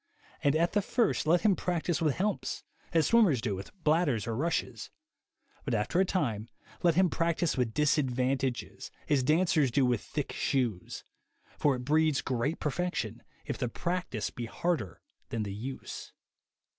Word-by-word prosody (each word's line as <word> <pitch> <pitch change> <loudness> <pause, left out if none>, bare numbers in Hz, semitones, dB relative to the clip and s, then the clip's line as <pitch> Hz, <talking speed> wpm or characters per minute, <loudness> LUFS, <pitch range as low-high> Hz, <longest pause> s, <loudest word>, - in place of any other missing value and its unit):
And, 140 +1 +3
at 170 +2 +2
the 205 - +3
first, 230 -5 +1
let 170 +2 +4
him 200 0 +4
practise 175 -1 -1
with 155 -4 +2
helps, 205 +2 -2 0.3
as 165 -2 +3
swimmers 210 - +4
do 110 -2 -1
with 95 +1 -6
bladders, 150 - +2
or 115 -2 -2
rushes; 165 +8 -2 0.7
but 130 -5 -1
after 110 +11 0
a 190 - +5
time 120 - -1 0.3
let 170 -2 +3
him 185 +1 +5
practise 170 -1 0
with 125 -3 -1
disadvantages, 135 -3 0 0.2
as 145 -3 +4
dancers 155 0 +3
do 130 +3 +3
with 120 -3 +1
thick - - -4
shoes; 120 -9 -1 0.6
for 145 -3 +3
it 125 0 -6
breeds 155 0 +2
great 130 +5 -1
perfection 150 - -2 0.2
if - - -4
the 125 - -1
practice 175 - -2
be 120 - -5
harder 115 - -2 0.3
than 115 -1 -2
the 100 -1 -4
use." 125 +6 -7
145 Hz, 155 wpm, -30 LUFS, 120-170 Hz, 0.7 s, a